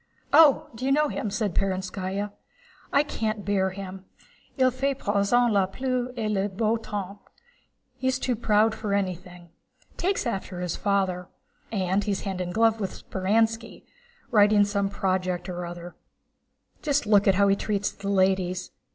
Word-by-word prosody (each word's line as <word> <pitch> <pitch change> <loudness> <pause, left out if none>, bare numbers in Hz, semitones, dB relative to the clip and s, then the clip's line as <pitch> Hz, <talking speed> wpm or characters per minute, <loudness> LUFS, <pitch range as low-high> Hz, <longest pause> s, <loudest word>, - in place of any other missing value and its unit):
"Oh, 300 -2 +6
you 260 +2 0
know 300 +1 +3
him?" 215 - -3
said 210 -2 -1
Perónskaya. 190 +1 -2 0.6
"I 280 - +4
can't 215 -7 -3
bear 190 -1 +1
him. 190 0 -8 0.5
Il 255 -1 +4
fait 270 +2 -1
à - - -24
présent 205 +4 +2
la 195 -2 +3
pluie 255 +4 -2
et 220 -2 -1
le 205 -1 0
beau 215 +3 0
temps. 205 -3 -5 0.4
* 255 - -44
He's 260 0 +1
too 255 -1 -1
proud 215 0 +3
for 215 -2 -2
anything. 180 -2 -4 0.5
Takes 385 -2 0
after 195 -5 -3
his 180 -2 -2
father. 190 -3 0 0.4
And 190 -1 0
he's 200 -1 -1
hand 190 -2 -3
in 180 - -3
glove 225 +2 +3
with 195 - -5
Speránski, 225 +4 0 0.5
writing 205 -2 +5
some 200 -1 -1
project 185 -2 -1
or 175 -1 -4
other. 175 0 -8 0.9
Just 290 -3 +1
look 205 -1 +4
how 200 +1 +4
he 195 - +4
treats 205 0 -1
the 200 0 -6
ladies! 185 -2 +1
200 Hz, 155 wpm, -26 LUFS, 190-225 Hz, 0.9 s, Oh